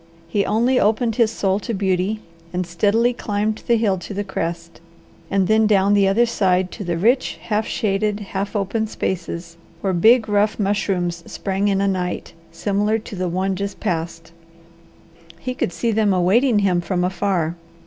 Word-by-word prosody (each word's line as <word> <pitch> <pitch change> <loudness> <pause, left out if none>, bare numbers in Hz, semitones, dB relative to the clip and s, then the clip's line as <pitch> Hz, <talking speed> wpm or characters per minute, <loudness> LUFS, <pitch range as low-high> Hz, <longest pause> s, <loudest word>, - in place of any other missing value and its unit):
He 200 +4 +1
only 240 +4 +2
opened 225 +1 +1
his 230 -3 +4
soul 195 -3 0
to 230 +1 -4
beauty, 190 +2 0 0.3
and 180 0 -2
steadily 210 +8 +2
climbed 215 -1 -2
the 235 - +4
hill 200 -4 +1
to 195 +3 -8
the 205 - -1
crest, 170 -3 -5 0.5
and 195 -1 +2
then 220 +1 +4
down 200 -1 +3
the 200 -1 +4
other 215 +5 +4
side 185 -5 +1
to - - -6
the 175 -2 -2
rich, 240 +9 +2
half 215 0 -1
shaded, 210 0 0
half 200 0 -4
open 210 +2 -1
spaces, 170 -4 -4 0.2
where 190 -1 0
big, 220 +6 +5
rough 210 +1 +2
mushrooms 190 -4 -1
sprang 195 +1 -1
in 195 -1 +1
a 200 - +2
night 180 -2 -2 0.2
similar 205 +5 0
to 215 -1 -8
the 185 -1 -2
one 190 +2 -1
just 200 +1 -4
passed. 165 -3 -3 1.1
He 255 +8 -4
could 250 - -2
see 180 +8 -1
them 210 -3 +2
awaiting 215 +7 +3
him 190 -4 +2
from 180 +1 -1
afar. 180 -3 0
200 Hz, 170 wpm, -21 LUFS, 180-215 Hz, 1.1 s, big